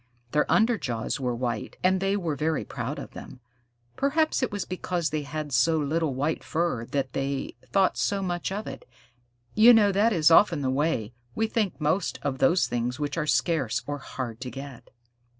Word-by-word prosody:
Their 150 - +1
under 225 0 +3
jaws 115 0 -3
were 125 -2 -1
white, 120 -2 -3
and 185 +1 +3
they 195 +1 +1
were 165 -6 -2
very 155 +2 -1
proud - - -4
of - - -8
them. - - -10 0.6
Perhaps 310 +3 +1
it 255 - 0
was 205 -1 -3
because 175 -2 -2
they 155 0 -1
had 150 +1 -5
so 145 +6 +3
little 155 -1 0
white 145 +4 -1
fur 160 -8 -1
that 135 0 -2
they 135 0 -2 0.2
thought 195 -2 +2
so 200 -1 0
much 175 0 -2
of 210 +2 -3
it. 135 0 -7 0.7
You 230 +3 +8
know 205 -2 +5
that 205 +4 +3
is 165 -5 +4
often 165 -3 +5
the 130 - +1
way 130 -6 0 0.2
we 225 - +1
think 215 -5 -1
most 160 +4 0
of 135 -2 -2
those 175 +7 +4
things 120 +2 -2
which 145 -1 -2
are 155 -2 -2
scarce 145 -9 +1
or 145 0 -4
hard 125 -3 -6
to 130 - -4
get. 135 -1 -9
155 Hz, 190 wpm, -26 LUFS, 135-190 Hz, 0.7 s, You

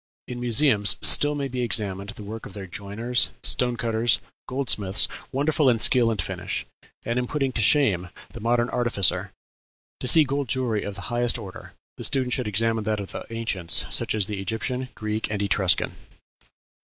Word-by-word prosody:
In 125 -1 -6
museums 120 -3 +3
still 145 0 +6
may 140 -1 -2
be 125 -1 -4
examined 100 -4 -1
the 105 0 -9
work 110 +2 -7
of - - -13
their 100 -1 -7
joiners, 110 +6 0
stone 125 -1 +1
cutters, 115 +1 +1 0.3
goldsmiths, 105 -7 +1 0.2
wonderful 140 0 +2
in 120 - +3
skill 120 +1 +4
and 110 -3 -2
finish, - - -4 0.4
and 120 +2 -1
in 125 - -2
putting 135 -2 -1
to 120 - -2
shame 100 - +3 0.2
the - - -9
modern 120 +2 +1
artificer.... 120 -7 +1 0.7
To - - -4
see 155 +5 +7
gold 140 -1 -2
jewellery 120 -4 -1
of 100 - -6
the 100 - -8
highest 120 0 +2
order, 100 -5 -10 0.2
the - - -7
student 130 -2 0
should 125 -4 -1
examine 115 +2 0
that 110 -1 -1
of 100 - -6
the - - -8
ancients, 110 -7 +1
such - - -1
as 105 -3 +1
the 105 0 -5
Egyptian, 125 +5 -3
Greek, 110 +1 -3
and 105 -1 -3
Etruscan." 100 -2 +1
115 Hz, 180 wpm, -24 LUFS, 105-125 Hz, 0.7 s, see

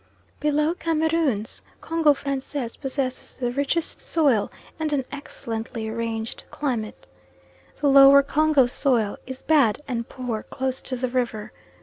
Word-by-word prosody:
Below 300 +2 +1
Cameroons, 320 - 0 0.2
Congo 325 -3 +2
Francais 275 -2 -3
possesses 265 -2 -3
the 245 -2 -1
richest 285 +5 -1
soil 280 -10 +1 0.3
and 310 -1 -1
an 270 -3 0
excellently 230 -5 -5
arranged 225 0 -4
climate. 240 -7 -4 0.7
The 290 - +3
lower 275 0 +8
Congo 300 -1 +3
soil 240 -4 +1
is 260 0 -8
bad 280 -9 +4
and 235 -3 -3
poor 245 -4 -4
close 265 -1 -3
to 255 - -4
the 255 +1 -1
river. 240 -4 -2
265 Hz, 125 wpm, -24 LUFS, 235-295 Hz, 0.7 s, lower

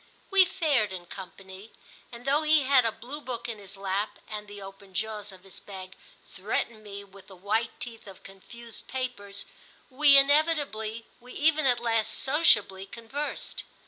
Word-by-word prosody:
We 390 -1 +8
fared 295 - +1
in 180 -2 -6
company, 190 +3 -10 0.4
and 240 +1 -10
though 285 +3 +3
he 310 -1 +5
had 260 -2 +5
a 225 - +2
blue 260 +7 -8
book 240 -3 -4
in 225 -3 -5
his 195 -1 -7
lap 195 +2 -1
and 210 -1 -6
the 205 0 -8
open 195 -1 -11
jaws 215 -1 -3
of 185 -1 -15
his 195 0 -11
bag 190 -1 -9 0.3
threatened 215 +3 -3
me 200 -1 -7
with 195 -1 -16
the 195 - -12
white 215 +5 -1
teeth 230 -2 -7
of 195 -2 -12
confused 230 +4 -11
papers, 205 -6 -4 0.5
we 280 +1 +7
inevitably, 275 -7 +2
we 250 +1 -11
even 310 -1 +4
at 245 -2 +4
last 225 -2 +1
sociably 205 - +3
conversed. 240 +8 -4
220 Hz, 165 wpm, -28 LUFS, 195-265 Hz, 0.5 s, We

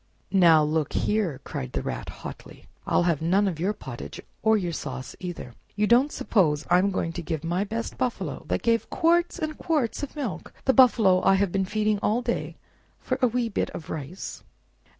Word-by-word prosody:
"Now 170 -5 +6
look 150 -1 0
here!" 190 -11 0
cried 65 - -5
the - - -2
Rat - - -4
hotly; - - -10 0.2
"I'll - - +3
have 170 -4 +1
none 190 +5 +3
of 170 -5 -3
your 185 +5 +1
pottage, 130 - -8 0.2
or 220 0 +4
your 180 -4 -2
sauce, 130 -4 -6
either. 175 -9 -6 0.2
You 210 +1 +2
don't 245 +7 +4
suppose 155 -9 +1
I 180 - +7
am 195 +2 +2
going 165 -3 -2
to 175 - -4
give 160 -2 -4
my 175 +4 0
best 225 +3 -4
buffalo, 255 -1 -2
that - - -1
gave 230 -1 +1
quarts 345 0 +2
and 310 -1 -4
quarts 300 -9 0
of 285 - -6
milk—the 265 - -2
buffalo 225 -8 +5
I 195 - +5
have 195 -1 +1
been 195 0 0
feeding 215 +1 0
all 230 +4 +1
day—for - - -5
a 255 - +5
wee 240 0 0
bit 220 - -1
of 160 - -7
rice? 160 +5 -6
195 Hz, 190 wpm, -26 LUFS, 165-230 Hz, 0.2 s, I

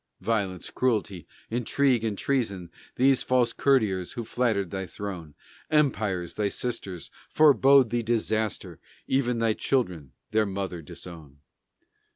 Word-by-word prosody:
Violence, 100 -3 -2
Cruelty, 105 -9 -1 0.2
Intrigue, 125 +1 +1
and 110 -3 -2
Treason. 100 -11 -1 0.2
These 135 +1 +3
the - - -9
false 125 -2 +2
courtiers 105 -10 +1
who 120 -2 -5
flattered 110 -6 0
thy 95 -1 -4
throne; 90 -8 -7 0.3
Empires, 105 - +1
thy 105 +2 0
sisters, 100 -7 -5 0.2
forbode 140 -4 +5
thee 120 0 +1
disaster, 110 -2 -1 0.3
Even 125 -3 +1
thy 115 -1 +2
children 90 - -1 0.2
their 110 -1 +2
mother 95 -3 -4
disown. 80 -2 -11
110 Hz, 125 wpm, -26 LUFS, 95-125 Hz, 0.3 s, forbode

